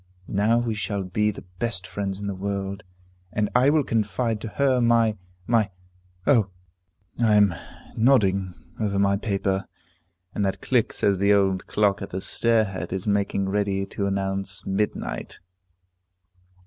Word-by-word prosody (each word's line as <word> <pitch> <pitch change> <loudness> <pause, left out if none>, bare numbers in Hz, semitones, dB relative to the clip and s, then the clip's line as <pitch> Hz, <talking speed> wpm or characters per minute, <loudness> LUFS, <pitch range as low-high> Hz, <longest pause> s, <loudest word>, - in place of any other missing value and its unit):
Now 105 +4 +2
we 120 -1 0
shall 100 -1 -2
be 105 +4 0
the 105 - -6 0.2
best 115 -6 -1
friends 95 +3 -4
in 100 - -5
the 100 - -2
world, 100 +1 -4 0.5
and 105 0 -1
I 125 +3 +5
will 150 0 +3
confide 115 -1 -1
to - - -4
her 130 +2 +2
my 115 -2 +3 0.3
my 115 -2 +2 0.6
O, 115 -8 +4 0.7
I 110 -3 +4
am 100 -3 +5 0.4
nodding 100 -7 +3 0.2
over 105 -3 0
my 100 0 +3
paper, 100 -2 -1 0.7
and 105 - -1
that 95 -1 -1
click - - +1
says 100 -2 +1
the 100 +1 +4
old 95 -2 +2
clock 105 -1 +1
at 100 - -5
the 95 - -4
stair 115 +3 +2
head 95 -4 -5
is 95 0 -3
making 100 -2 0
ready 100 -1 0
to 100 0 -3
announce 95 0 -2
midnight. 100 +2 -2
100 Hz, 150 wpm, -25 LUFS, 95-110 Hz, 0.7 s, I